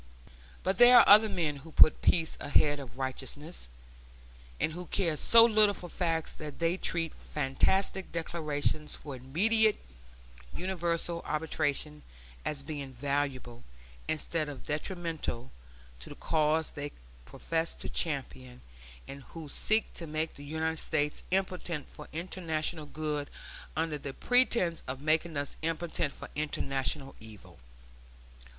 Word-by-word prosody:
But 190 +4 0
there 245 0 +9
are - - +10
other 215 +2 +8
men 155 -7 -1
who 155 +4 -12
put 155 - +6
peace 165 -2 +2
ahead 145 0 +3
of 130 -2 -10
righteousness, 135 - -6 0.9
and - - +1
who 175 +1 -7
care 170 -6 0
so 230 +8 +7
little 215 -3 +5
for 175 - -9
facts 165 -3 -1
that 150 -2 -8
they 165 +1 +1
treat 165 -3 -1
fantastic 185 +7 0
declarations 155 -2 -2
for 145 -3 -8
immediate 210 - +2 0.8
universal 170 -2 -1
arbitration 150 -1 -2 0.4
as 140 -2 -2
being 140 -2 -6
valuable, 135 - -2 0.4
instead 155 0 -1
of 140 -3 -9
detrimental, 155 -5 -3 0.5
to - - -10
the - - -9
cause 155 0 +1
they 145 -1 -6 0.3
profess 165 - -2
to - - -7
champion, 130 -5 -3 0.5
and 140 0 -8
who 160 +4 -10
seek 215 +9 0
to 165 - -5
make 155 +1 -2
the 145 - -12
United 160 +2 -2
States 150 -2 -1
impotent 180 -5 -1
for 150 - -12
international 160 -2 -3
good 150 0 -3 0.5
under 160 -2 -1
the 140 -1 -7
pretense 240 -9 +3
of 130 +1 -4
making 155 +2 0
us 140 0 -3
impotent 165 -1 -2
for - - -10
international 135 -2 -2
evil. 110 - -14
155 Hz, 130 wpm, -30 LUFS, 145-170 Hz, 0.9 s, are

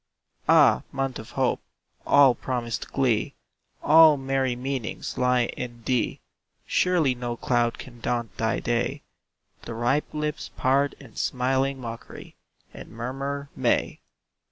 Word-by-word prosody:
Ah, - - +6
month 135 -2 -2
of 110 - -10
hope! - - +1 0.5
all 140 -3 +6
promised 120 -3 -4
glee, 120 -6 +1 0.5
All 155 -1 +7
merry 135 -2 0
meanings, 130 -2 -4
lie 125 -1 +2
in 120 -2 -7
thee; 125 -1 -1 0.4
Surely 175 -7 +2
no 120 -1 -4
cloud 120 -1 +1
can 120 -2 -11
daunt 120 -1 -2
thy 115 0 0
day. 120 +4 -1 0.6
The 115 - -7
ripe 130 +6 0
lips 150 0 -3
part 140 +2 +2
in 130 -6 -15
smiling 135 +1 0
mockery, 115 -2 -9 0.4
And - - -10
murmur, 135 +5 -5
"May." - - 0
130 Hz, 125 wpm, -25 LUFS, 120-135 Hz, 0.6 s, All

